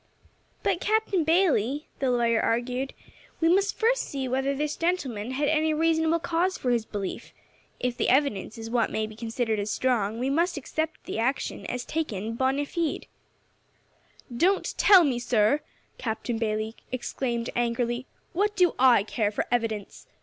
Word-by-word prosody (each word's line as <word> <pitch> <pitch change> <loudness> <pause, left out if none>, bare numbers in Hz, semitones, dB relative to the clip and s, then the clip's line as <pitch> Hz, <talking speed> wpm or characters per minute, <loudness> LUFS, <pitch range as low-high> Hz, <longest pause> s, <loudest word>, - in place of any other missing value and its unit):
"But, - - +1
Captain 430 -5 +1
Bayley," 300 - +2
the 270 - +1
lawyer 235 -2 +2
urged, 250 +3 -1 0.4
"we 325 - +3
must 390 +4 +2
first - - +2
see 270 -2 -4
whether 265 +2 0
this 300 +1 -2
gentleman 270 - -1
had 280 +3 0
any 310 0 +2
reasonable 320 +1 +2
cause 345 +3 0
for 250 - -1
his 235 -2 +1
belief. 200 -3 -5 0.5
If 245 -1 -2
the - - +1
evidence 260 -6 +1
is 225 0 -6
what 235 -2 +2
may 215 - -1
be 215 0 -10
considered 225 -1 -2
as 205 +1 -2
strong, 225 -3 0
we 250 +2 -1
must 340 +3 +1
accept 315 +3 -3
his - - -4
action 245 +5 -1
as 250 0 -4
taken 230 -9 -3
bonâ 265 +3 +1
fide." 330 -2 -2 1.3
"Don't 370 +9 +1
tell 385 -4 +7
me, 260 -6 +1
sir," 240 +3 +2 0.4
Captain 225 0 -3
Bayley 215 0 -2 0.2
exclaimed 240 -1 -2
angrily. 240 +1 -1 0.3
"What 415 +4 +1
do 360 -3 +4
I 250 -5 +6
care 215 0 0
for 210 - -2
evidence? 225 -4 -2
255 Hz, 155 wpm, -27 LUFS, 230-320 Hz, 1.3 s, tell